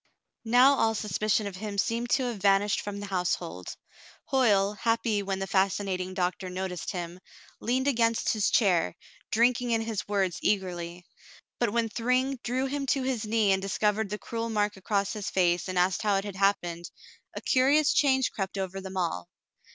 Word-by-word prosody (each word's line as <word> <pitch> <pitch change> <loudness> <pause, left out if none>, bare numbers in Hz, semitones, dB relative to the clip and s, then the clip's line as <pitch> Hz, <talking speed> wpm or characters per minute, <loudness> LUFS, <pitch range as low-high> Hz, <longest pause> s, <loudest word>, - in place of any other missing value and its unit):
Now 250 +4 +6
all 225 0 +2
suspicion 215 +1 0
of 195 -2 -6
him 205 0 -5
seemed 235 +3 0
to 265 - +2
have 240 -3 -3
vanished 200 +1 +2
from 205 -1 -6
the 205 - -5
household. 180 - -3 0.6
Hoyle, 210 -6 +3
happy 225 -1 0
when 195 -1 -2
the 195 - -3
fascinating 190 -1 0
doctor 185 0 -2
noticed 180 -2 -4
him, 175 -1 -5 0.4
leaned 260 +3 0
against 230 -4 +2
his 215 -3 +1
chair, 180 - +2 0.3
drinking 240 +2 +2
in 225 -1 +2
his 225 -2 -4
words 195 -4 0
eagerly. 175 -3 -2 0.5
But 240 - +2
when 230 +1 0
Thryng 255 +4 0
drew 255 +2 -1
him 275 0 -3
to 270 0 +1
his 255 -4 -2
knee 215 -2 +2
and 190 0 +2
discovered 210 +2 0
the 210 - -3
cruel 230 +1 -4
mark 210 -1 0
across 200 +1 -1
his 210 -3 -4
face 175 -2 +1
and 185 - -3
asked 180 +1 +2
how 210 -2 +2
it 195 +1 -1
had 200 -2 -6
happened, 175 -4 0 0.5
a - - -3
curious 285 +4 +3
change 265 -3 +3
crept 195 -1 -4
over 190 0 -4
them 190 0 -7
all. 165 - -2
205 Hz, 175 wpm, -28 LUFS, 190-230 Hz, 0.6 s, Now